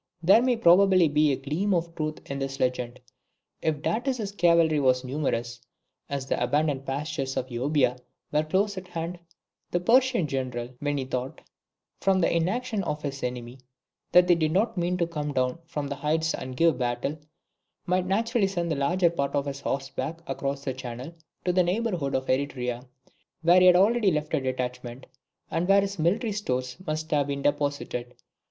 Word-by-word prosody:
There 195 +7 +6
may 250 -1 +2
probably 185 -2 +6
be 150 0 +3
a - - +2
gleam 155 +9 -1
of 170 -1 -2
truth 155 -1 -4
in 140 0 -5
this 135 0 -4
legend. 125 -1 -1 0.6
If 155 -1 -1
Datis's 235 -2 -1
cavalry 170 -4 +3
was 130 -2 +2
numerous, 125 -4 -2 0.5
as 140 -2 -3
the 135 - -1
abundant 140 +1 0
pastures 140 -1 -3
of 130 0 -3
Euboea 125 0 +1 0.3
were 150 - +3
close 195 +5 0
at 185 - -14
hand, 170 0 -5 0.5
the 175 - 0
Persian 245 +1 +3
general, 130 -4 -3
when 145 0 -1
he 135 - -2
thought, 130 +3 -4 0.6
from 190 -1 +2
the 170 - +2
inaction 210 +5 0
of 150 -3 -3
his 140 -1 -4
enemy, 125 0 -5 0.5
that 180 0 +7
they 180 - +6
did 160 -2 +1
not 215 +6 +1
mean 180 0 0
to 170 - +1
come 150 -3 -4
down 130 +3 0
from 150 -3 -3
the 140 0 -5
heights 160 +3 0
and 130 0 -6
give 165 -5 +3
battle, 125 +5 -2 0.7
might 180 +1 0
naturally 225 +2 +1
send 175 -3 -2
the - - +1
larger 170 +5 +2
part 140 -5 -2
of 140 0 +1
his 140 -1 -5
horse 135 0 -3
back 165 +6 -5
across 140 0 -3
the 135 - -2
channel 130 +4 -7 0.3
to 180 - +2
the 180 - +4
neighbourhood 180 -6 -1
of 130 0 -1
Eretria, 125 -2 -1 0.6
where 175 +2 +6
he 185 - +6
had 180 - +8
already 210 +3 +4
left 150 -2 -2
a 155 - +2
detachment, 125 -1 -4 0.5
and 170 +2 0
where 200 +1 +6
his 200 -2 -4
military 200 +7 +1
stores 130 -11 -2
must 155 +1 -3
have 145 -2 +2
been 140 -1 -3
deposited. 145 -4 -1
150 Hz, 180 wpm, -26 LUFS, 135-180 Hz, 0.7 s, had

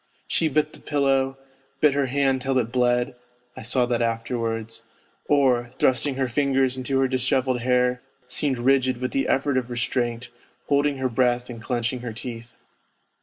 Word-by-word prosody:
She 165 - +2
bit 155 +1 0
the - - -13
pillow, 135 -2 +1 0.4
bit 150 -1 +4
her 140 -1 +1
hand 135 0 +1
till 135 0 0
it 120 -2 0
bled 125 +1 +1 0.4
(I - - -8
saw 125 +2 +1
that 120 -1 -1
afterwards), 115 -1 -2 0.5
or, 130 -4 +3
thrusting 130 +2 +2
her 135 -1 0
fingers 135 0 +1
into 130 +1 -1
her 135 - +3
dishevelled 130 0 0
hair 125 0 +2 0.3
seemed 130 +1 -1
rigid 130 0 +2
with 125 0 -2
the 135 - 0
effort 135 0 +1
of 125 -1 -1
restraint, 120 0 -2 0.4
holding 145 0 +2
her 130 0 0
breath 125 0 +1
and 115 -1 -9
clenching 120 +1 -2
her 120 -2 -6
teeth. 115 0 -8
125 Hz, 165 wpm, -24 LUFS, 120-135 Hz, 0.5 s, bit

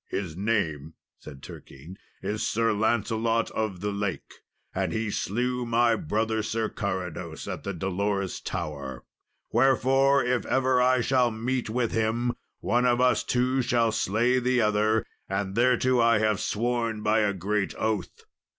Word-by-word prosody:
"His 90 -6 -4
name," 80 -7 -1 0.2
said 70 -3 -12
Turquine, 75 +8 -11 0.3
"is 105 +1 -2
Sir 115 0 +1
Lancelot 115 +1 0
of 105 -5 -3
the 105 0 -1
Lake; 100 -2 -4 0.4
and - - -1
he 110 -1 -2
slew 125 +5 -1
my 115 0 +3
brother 110 +4 -1
Sir 110 +1 -2
Carados, 95 -5 -4
at - - -4
the 100 - -3
dolorous 95 +1 -2
tower; 70 -4 -5 0.5
wherefore, 135 +1 +3
if 125 0 +1
ever 130 -1 +2
I 130 0 +3
shall 125 0 +2
meet 120 +2 -2
with 120 0 0
him, 115 +2 0 0.3
one 125 +1 +2
of 120 0 +2
us 125 0 +3
two 125 +2 +1
shall 120 -2 +2
slay 120 +6 +1
the 125 0 +1
other; 110 0 +2 0.2
and 95 0 -2
thereto 125 +2 +3
I 115 -1 +4
have 110 -1 +1
sworn 115 -1 -1
by 110 +1 +3
a 105 -1 +2
great 100 +2 -2
oath. 110 -4 -2
110 Hz, 150 wpm, -26 LUFS, 100-120 Hz, 0.5 s, I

